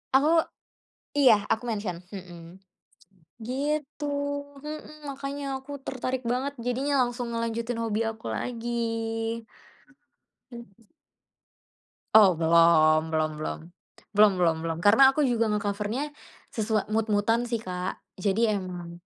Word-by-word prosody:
Oh 310 +5 +5 0.8
iya, 265 -5 +7 0.2
aku 225 - +1
mention 205 -5 -3 0.2
mhm, 180 -3 -9 1.1
gitu 290 +3 -2 0.6
mhm, 305 0 -8
makanya 275 +1 -5 0.2
aku 265 +2 -12
tertarik 255 0 -3
banget, 265 +3 -1
jadinya 265 +4 0
langsung 245 0 -3
ngelanjutin 230 0 -2
hobi 220 -1 -1
aku 220 0 -10
lagi. 240 -1 -4 1.8
Mhm. 230 -3 -13 1.3
Oh, 205 -4 +8
belum, 160 -1 +4
belum 155 -1 0
belum, 155 - -4 0.6
belum 215 0 +8
belum 165 -2 +4
belum, 165 -1 -2
karena 245 +8 +7
aku 300 - +1
juga 240 -5 +2
nge-cover-nya 210 +5 -1 0.4
sesua 220 -1 0
mood-mood-an 220 +2 +1
sih 235 -2 -2
Kak. 180 -2 -4 0.2
Jadi 205 +4 +1
emang, 180 -4 -4
225 Hz, 110 wpm, -27 LUFS, 190-255 Hz, 1.8 s, Oh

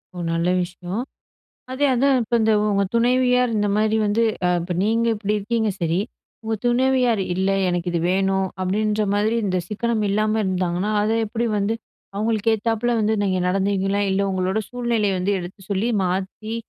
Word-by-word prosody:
ஓ! - - -8 0.2
நல்ல 170 +2 0
விஷயம். 180 +4 -5 0.7
அதே 270 +3 +1
அதான் 270 +2 +3
இப்ப 235 +1 0
இந்த 220 0 +3 0.2
உங்க 200 -1 +2
துணைவியார் 250 +1 +3
இந்தமாரி 210 +1 +1
வந்து 215 +3 +2 0.2
அ - - +3
இப்ப 175 +1 -4
நீங்க 230 +2 +1
இப்படி 210 0 -2
இருக்கீங்க 220 +1 0
சரி. 165 +2 +1 0.4
உங்க 220 0 -1
துணவியார், 250 -2 +2
"இல்ல 190 +2 0 0.2
எனக்கு 175 0 -1
இது 170 - 0
வேணும்." 190 0 +1
அப்படீன்ற 210 +3 0
மாரி 210 +3 +1
இந்த 185 -2 0
சிக்கனம் 220 +1 -1
இல்லாம 215 +2 +1
இருந்தாங்கன்னா, 185 +1 -1
அத 215 +1 +1
எப்படி 230 +2 -2
வந்து 205 +2 0 0.4
அவுங்களுக்கு 220 +1 +1
ஏத்தாப்ல 230 +2 0
வந்து 215 +1 +1
நீங்க 190 -2 +1
நடந்தீங்களா? 195 +1 0
இல்ல, 190 - +1
உங்களோட 185 +2 0
சூழ்நிலைய 235 -5 0
வந்து 190 +3 0
எடுத்து 180 +2 -9
சொல்லி, 200 +4 0
மாத்தி, 190 +4 -3
210 Hz, 160 wpm, -22 LUFS, 190-230 Hz, 0.7 s, அதான்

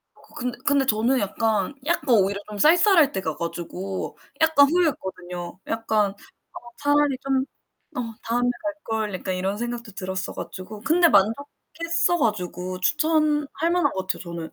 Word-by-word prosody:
어 - - -22
근데 245 -1 -3
근데 280 -2 +3
저는 235 +3 +2
약간 220 +5 0
약간 290 -6 +2
오히려 200 0 +2
좀 210 -1 -7
쌀쌀할 330 - +5
때 - - -2
가 160 -4 -3
가지고 175 +3 -5 0.2
약간 315 -3 +6
후회했거든요. 185 - -2
약간 215 -3 0 0.6
차라리 290 -1 +2
좀 270 -1 +1 0.5
어, 230 -2 -3
'다음에 245 +2 +1
갈걸.' 225 -10 -3
약간 185 0 -3
이런 190 +2 -2
생각도 240 -1 -5
들었어 190 0 -4
가지고. 195 +3 -8
근데 335 +9 +4
만족했어 325 - +1
가지고 185 - -2
추천할 305 - +1
만한 345 -5 +2
것 190 -1 -4
같아요 - - -1
저는. 170 -2 -7
230 Hz, 315 characters per minute, -24 LUFS, 190-295 Hz, 0.6 s, 약간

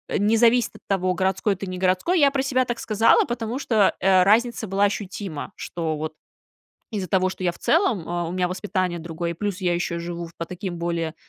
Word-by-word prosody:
не 215 +3 +3
зависит 235 0 +3
от - - -14
того, 185 -2 +1
городской 190 +2 +1
ты, 195 - -6
не 185 -1 -5
городской. 185 - +2
Я 285 -2 +6
про 270 -1 -1
себя 255 -1 +2
так 240 -1 -3
сказала, 220 +1 +3
потому 240 0 -3
что 220 -7 +2
разница 210 +5 +3
была 195 +2 +1
ощутима, 195 -4 -3
что 160 -3 -3
вот 155 +1 -4 0.8
из-за 195 -4 -3
того, 185 +1 +2
что 185 - -8
я 180 - +2
в 170 - -13
целом, 285 - +1 0.2
у - - -5
меня 180 0 0
воспитание 185 -1 -2
другое, 170 +1 -4
плюс 200 +2 -3
я 175 -2 +1
еще 170 -1 -2
живу 170 0 -5
по 170 - -2
таким 180 -1 -6
более, 170 -2 -2
190 Hz, 195 wpm, -23 LUFS, 175-220 Hz, 0.8 s, Я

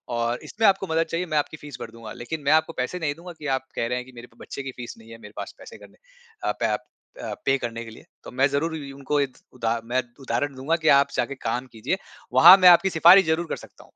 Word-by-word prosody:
और 120 +1 -1
इसमें 220 +1 -2
आपको 195 -1 +2
मदद 160 0 +1
चाहिए 170 +2 -1
मैं 155 -1 -1
आपकी 150 +1 -1
फीस 145 -4 -10
भर 110 - -7
दूँगा। 115 -2 -10
लेकिन 155 +6 -6
मैं 140 - +2
आपको 160 +1 +2
पैसे 130 +8 -3
नहीं 145 -3 -2
दूँगा 175 +2 -10
कि 150 - -9
आप 130 - -5
कह 115 - -1
रहे 125 - -1
हैं 125 - -5
कि 130 - -15
मेरे 120 +1 -10
तो 115 - -28
बच्चे 140 - -8
की 135 - -5
फीस 120 -1 -7
नहीं 115 0 -17
है 115 - -10
मेरे 105 -1 -13
पास, - - -6
पैसे - - -12
करने - - -17 0.5
अ, - - +1
प - - +1 0.4
अ, - - -4
पे 135 0 +3
करने 115 -2 -5
के 115 - -10
लिए। 110 - -15 0.2
तो - - -10
मैं 130 +2 +2
ज़रूर 155 +4 -1
उ 140 -3 -8
उनको 140 +1 -1
एक 135 -2 -3 0.2
उदा 115 -2 -1
मैं 125 +2 0 0.2
उदाहरण 130 +3 -2
दूँगा 140 +6 0
की - - +3
आप 140 0 +1
जाके 140 - -1
काम 125 +2 -1
कीजिए 110 - -2 0.4
वहाँ 185 - +10
मैं 185 -1 +8
आपकी 175 +2 +6
सिफ़ारिश 175 +3 +7
ज़रूर 165 +2 0
कर - - 0
सकता - - -13
हूँ। - - -16
140 Hz, 270 wpm, -24 LUFS, 120-160 Hz, 0.5 s, वहाँ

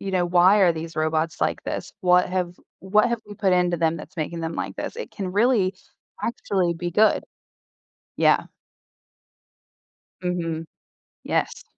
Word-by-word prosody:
You 195 - -4
know, 180 -1 +2
"Why 180 +4 +5
are 175 -3 +5
these 165 0 -7
robots 155 +1 0
like - - 0
this? - - -4
What 180 -2 +4
have 180 -1 -1 0.3
what 210 +5 +3
have 235 -2 -1
we 205 - -9
put 195 -3 +1
into 180 -1 +2
them 165 0 +1
that's - - -11
making 165 +2 -3
them 165 0 -3
like - - -4
this?" - - -5
It 480 - -6
can 190 -3 -4
really, 205 -3 +3 0.5
actually 190 -6 0
be 175 +1 -4
good. 215 +5 +3 0.9
Yeah. - - +4 1.8
Mhm. 165 -2 -2 0.6
Yes. - - -1
180 Hz, 155 wpm, -24 LUFS, 165-195 Hz, 1.8 s, Why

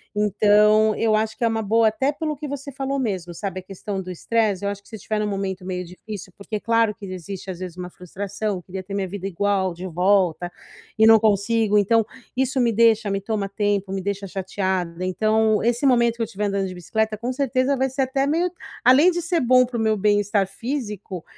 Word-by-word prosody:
Então, 210 +1 +4
eu 225 -1 +1
acho 220 0 -1
que - - -3
é - - +4
uma 225 -1 0
boa, 220 +1 +3
até 265 +6 0
pelo 305 0 -3
que 295 +2 -6
você 280 0 -6
falou 270 +1 -3
mesmo, 190 -9 -2
sabe, 190 +1 -4
a - - -11
questão 195 +1 -5
do 185 - -9
estresse. 205 +2 0
Eu - - +1
acho 200 0 -5
que - - -21
se 225 - -8
eu - - -6
estiver 215 +2 -3
num 210 - 0
momento 195 -2 -3
meio 180 -1 -3
difícil 185 +1 -9
porque 210 +1 -5
claro 230 -1 +2
que 210 - -10
existe 185 +1 -6
às 175 - -8
vezes 180 -2 -7
uma 180 0 -6
frustração, 195 +2 -4
queria 185 +2 -7
ter 190 +2 -9
minha 195 -1 -1
vida 195 +1 -5
igual 195 0 0
de 175 +2 -8
volta, 180 -1 +2 0.5
e 220 - +6
não 225 0 +8
consigo, 210 0 +2
então 225 +3 +4 0.3
isso 265 +1 0
me 235 -1 +3
deixa, 225 -1 +3
me 195 - 0
toma 205 -1 -2
tempo, 200 -1 -1
me 195 0 -2
deixa 200 +1 -3
chateada. 185 -2 -3
Então, 215 +3 +2
esse 240 +4 +1
momento 235 -3 +4
que 235 - -6
eu - - +2
estiver 210 0 -4
andando 200 -1 -1
de 185 - -7
bicicleta 215 +5 -2
com 240 +4 -3
certeza 265 0 +1
vai 265 +1 +1
ser 265 +1 0
até 270 +1 0
meio 330 +5 +1 0.3
além 275 +9 +6
de 350 0 -2
ser 340 0 0
bom 255 0 +5
pro 245 -1 -5
meu 220 -1 +2
bem-estar 205 -1 +2
físico, 210 - -5
210 Hz, 220 wpm, -23 LUFS, 190-230 Hz, 0.5 s, não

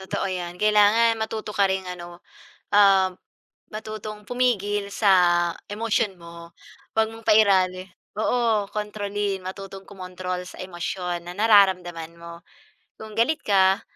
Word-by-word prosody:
Totoo 190 - -3
'yan. 175 -1 -5
Kailangan 215 +3 +4
matuto 220 -1 -4
ka 200 -1 +2
ring 190 0 -1
ano, 175 -1 -9 0.5
ah, 195 -2 +6 0.6
matutong 215 0 -7
pumigil 205 -5 0
sa 200 -3 +3 0.6
emosyon 210 -1 -1
mo. 170 0 -12 0.4
Huwag 220 0 +3
mong 225 0 -13
pairali 190 -3 +3 0.3
oo, 220 -2 +1
kontrolin, 205 -2 -3
matutong 195 +1 -8
kumontrol 185 -1 -6
sa 185 - -9
emosyon 175 -1 -5
na 175 - -6
nararamdaman 185 -6 +3
mo. 170 0 -11 0.6
Kung 220 0 -10
galit 290 +7 +1
ka 195 0 +3
200 Hz, 120 wpm, -24 LUFS, 185-215 Hz, 0.6 s, ah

